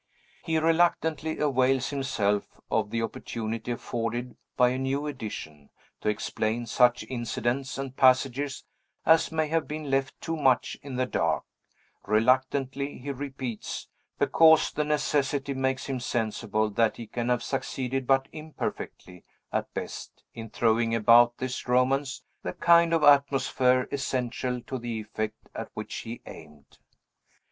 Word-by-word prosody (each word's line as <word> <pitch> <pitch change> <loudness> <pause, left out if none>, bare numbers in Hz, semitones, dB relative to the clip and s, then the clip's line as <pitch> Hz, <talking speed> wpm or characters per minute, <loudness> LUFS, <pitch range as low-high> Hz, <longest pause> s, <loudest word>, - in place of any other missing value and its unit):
He 160 -1 0
reluctantly 160 -1 +2
avails 135 -2 +2
himself 105 -8 -1
of - - +1
the 115 +1 -1
opportunity 115 +1 -4
afforded 120 +1 -4 0.2
by 125 0 +5
a 130 +1 -2
new 135 +2 -1
edition, 100 - -7 0.3
to - - 0
explain 110 +2 -1
such 120 +2 +3
incidents 125 +2 -2
and 135 -1 -5
passages 130 +1 +2 0.4
as 160 +1 +5
may 160 -1 0
have 165 0 0
been 150 -2 -5
left 135 0 0
too 165 - -3
much 135 -5 +2
in 140 -2 -7
the 130 0 +1
dark; 80 -9 0 0.6
reluctantly, 130 +5 +1
he 140 +3 -5
repeats, 130 -4 -5 0.3
because 160 -1 +5
the 150 - -1
necessity 145 -2 0
makes 130 0 -1
him 135 -2 -3
sensible 110 -2 -1
that 115 +2 +1
he 115 - -7
can 120 +2 -3
have 125 -1 +1
succeeded 135 -1 -3
but 135 0 +3
imperfectly, 150 - -6 0.3
at - - -1
best, - - -7
in 115 -1 -8
throwing 115 +1 +2
about 120 +2 +6
this 130 0 -4
Romance 130 +2 +1 0.2
the - - -4
kind 170 -1 +5
of 165 -2 +2
atmosphere 135 -3 +4
essential 125 -2 -2
to 130 +2 -5
the 115 -1 -4
effect 110 0 -5
at - - -6
which - - -6
he 115 +1 -7
aimed. 75 -3 -14
130 Hz, 135 wpm, -27 LUFS, 115-140 Hz, 0.6 s, about